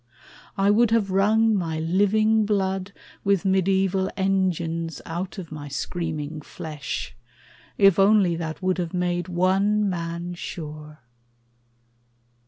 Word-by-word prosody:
I 195 +1 +4
would 230 +2 +4
have 220 -4 +1
wrung 220 +4 +3
My 165 -5 -2
living 205 +6 +2
blood 195 -2 -1 0.3
with 195 -1 +1
mediaeval 190 0 +2
engines 170 -5 -1
Out 175 +5 -5
of 175 -5 -8
my 150 -1 -7
screaming 155 0 -4
flesh, 150 0 -6 0.6
if 195 -2 +5
only 195 -3 +4
that 165 +1 -5
Would 185 0 +1
have 175 0 -3
made 175 -1 -1
one 195 +4 +2
man 170 -1 -3
sure. 155 -3 -8
185 Hz, 115 wpm, -24 LUFS, 165-195 Hz, 0.6 s, if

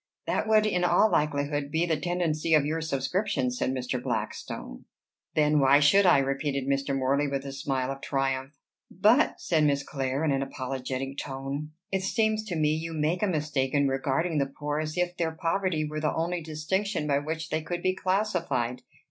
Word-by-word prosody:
"That - - -1
would 215 -1 +4
in 180 -4 +1
all 175 +5 +4
likelihood 145 -2 0
be 160 +3 +1
the 165 -2 +1
tendency 165 -1 0
of 150 -2 +3
your 160 +2 -1
subscription," 155 -2 -1
said 125 - -1
Mr. 125 -1 -2
Blackstone. - - -4 0.5
"Then 150 -1 +4
why 140 +1 +6
should 185 +7 +5
I?" 175 - +7
repeated 135 0 -1
Mr. 140 0 0
Morley 140 +2 +1
with 140 0 -3
a 140 - -5
smile 135 -1 -2
of 135 0 -7
triumph. 135 0 -1 0.4
"But," 215 - +3
said 160 -3 +1
Miss 140 -1 +2
Clare, 135 +1 -2
in 150 - +2
an 135 0 +1
apologetic 135 0 -4
tone, 140 +2 -5 0.2
"it 190 -1 0
seems 220 +2 +1
to 185 -5 -4
me 155 -2 +2
you 165 +1 -3
make 160 +3 0
a 210 - +2
mistake 150 -5 -1
in 140 -1 +3
regarding 140 +5 0
the 140 - +1
poor 145 +2 -3
as 155 +1 -4
if 180 0 0
their 165 -2 -1
poverty 165 -1 0
were 155 0 -4
the 155 - 0
only 170 +2 -1
distinction 160 +4 -2
by 140 -1 +2
which 160 +2 -4
they 155 - -1
could 175 +2 -4
be 185 - +2
classified. 175 - -1
150 Hz, 190 wpm, -27 LUFS, 135-175 Hz, 0.5 s, I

